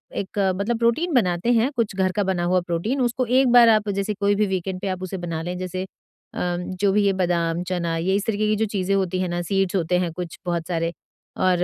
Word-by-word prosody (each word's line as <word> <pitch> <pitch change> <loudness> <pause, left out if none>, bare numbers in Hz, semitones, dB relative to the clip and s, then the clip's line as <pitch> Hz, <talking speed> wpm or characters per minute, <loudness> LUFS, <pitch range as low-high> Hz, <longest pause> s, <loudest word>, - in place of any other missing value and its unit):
एक 200 +1 -4 0.2
मतलब 215 +5 -1
प्रोटीन 270 +9 +1
बनाते 185 -2 +2
हैं 235 +4 +2
कुछ 230 -5 -1
घर 190 -1 +1
का 205 +2 0
बना 185 -2 -1
हुआ 180 +1 +2
प्रोटीन 210 +11 -1
उसको 245 +1 0
1 255 +3 +3
बार 240 -1 +8
आप 215 -1 +3
जैसे 200 +1 -1
कोई 200 0 +1
भी 210 +1 +2
वीकेंड 190 0 -3
पे 200 - -3
आप 185 0 -3
उसे 185 +1 -4
बना 170 -3 -4
लें 180 +1 -4
जैसे 185 0 -4 0.5
अम, 175 0 -1 0.2
जो 200 - +4
भी 205 +1 +3
ये 200 - +4
बादाम, 170 -2 0
चना, 175 -2 -2
ये 180 +4 0
इस 200 - -1
तरीके 215 -1 0
की 215 - +2
जो 220 - +1
चीजें 195 -2 -1
होती 185 -2 0
हैं 185 - 0
ना 175 0 -2
सीड्स 195 +1 0
होते 180 -1 +1
हैं 175 -2 -1
कुछ 175 -1 -6
बहुत 170 -2 -2
सारे 165 -1 -1 0.5
और 180 -1 +2
190 Hz, 240 wpm, -23 LUFS, 175-210 Hz, 0.5 s, बार